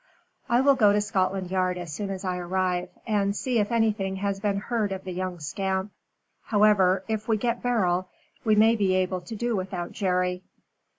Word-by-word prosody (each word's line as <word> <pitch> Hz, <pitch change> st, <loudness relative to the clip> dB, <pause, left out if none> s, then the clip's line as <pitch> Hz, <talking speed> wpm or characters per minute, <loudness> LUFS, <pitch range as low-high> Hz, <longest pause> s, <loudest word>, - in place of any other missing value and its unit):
"I 240 Hz, +1 st, +4 dB
will 280 Hz, +1 st, +5 dB
go 210 Hz, -6 st, +4 dB
to 210 Hz, -, +3 dB
Scotland 190 Hz, -2 st, -1 dB
Yard 185 Hz, -1 st, 0 dB
as 175 Hz, -4 st, -6 dB
soon 200 Hz, +6 st, -4 dB
as 195 Hz, 0 st, -5 dB
I 185 Hz, -1 st, -1 dB
arrive, 180 Hz, 0 st, -1 dB, 0.2 s
and 200 Hz, -2 st, +1 dB
see 245 Hz, +1 st, 0 dB
if 210 Hz, +2 st, 0 dB
anything 215 Hz, -4 st, +1 dB
has 195 Hz, 0 st, -2 dB
been 200 Hz, -1 st, 0 dB
heard 215 Hz, 0 st, -1 dB
of 190 Hz, -1 st, -4 dB
the 185 Hz, -, -6 dB
young 180 Hz, -1 st, -4 dB
scamp. 190 Hz, +5 st, -2 dB, 0.5 s
However, 205 Hz, -3 st, +4 dB
if 220 Hz, -1 st, -3 dB
we 220 Hz, -2 st, +2 dB
get 235 Hz, +2 st, -1 dB
Beryl, 185 Hz, -7 st, +1 dB, 0.3 s
we 215 Hz, -3 st, +3 dB
may 220 Hz, +2 st, +5 dB
be 195 Hz, -4 st, +1 dB
able 185 Hz, -1 st, 0 dB
to 200 Hz, +6 st, -8 dB
do 235 Hz, +1 st, -1 dB
without 185 Hz, -2 st, -4 dB
Jerry." 180 Hz, -2 st, 0 dB
195 Hz, 190 wpm, -26 LUFS, 185-215 Hz, 0.5 s, will